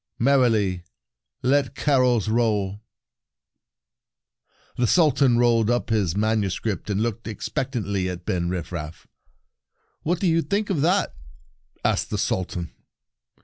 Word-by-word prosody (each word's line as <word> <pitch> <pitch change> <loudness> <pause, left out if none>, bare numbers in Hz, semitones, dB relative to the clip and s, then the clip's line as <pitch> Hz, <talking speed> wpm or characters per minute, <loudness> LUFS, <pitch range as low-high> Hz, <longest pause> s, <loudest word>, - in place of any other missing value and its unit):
Merrily 115 -8 +2 0.6
let 135 +1 +2
carols 125 -7 +2
roll! 105 -3 0 1.0
" - - -41
The 120 - +3
Sultan 140 -7 +4
rolled 115 -2 +3
up 120 -2 0
his 100 -5 +1
manuscript, 105 -2 -1
and 100 +1 0
looked 115 0 -3
expect 135 +5 -4
antly 100 -5 -1
at 90 -1 -8
Ben 85 -1 -1
Rifraf. 85 -3 -5 1.0
"What 170 +2 -1
do - - -1
you 165 -1 +3
think 200 +3 -1
of 160 -7 0
that?" 180 +6 +2 0.7
asked - - +1
the - - -2
Sultan. 90 -2 -2
115 Hz, 120 wpm, -24 LUFS, 95-135 Hz, 1.0 s, Sultan